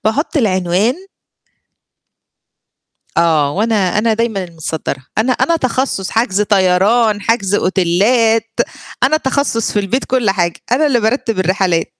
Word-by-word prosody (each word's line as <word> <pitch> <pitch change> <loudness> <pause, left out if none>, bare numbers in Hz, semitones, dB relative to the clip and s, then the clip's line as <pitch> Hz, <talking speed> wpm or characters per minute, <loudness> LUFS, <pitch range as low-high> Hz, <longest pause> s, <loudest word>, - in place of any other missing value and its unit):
باحط 270 +10 -1
العنوان 190 -1 +1 2.2
آه 160 -4 +2
وأنا 210 0 0
أنا 225 +1 +2
دايمًا 220 -3 -1
المتصدرة، 160 -5 -5
أنا 225 +4 +2
أنا 335 +6 +1
تخصص 255 - -2
حجز 220 -3 +1
طيران، 205 +2 +2
حجز 205 -3 0
أوتيلّات، 220 +5 +1 0.4
أنا 305 +4 +3
تخصص 265 -5 -1
في 210 - 0
البيت 205 +7 -2
كل 250 -5 0
حاجة، 175 -3 -1
أنا 285 +5 +3
اللي 255 -4 +2
بارتّب 225 -1 -1
الرحلات. 185 -2 0
215 Hz, 120 wpm, -15 LUFS, 185-235 Hz, 2.2 s, أنا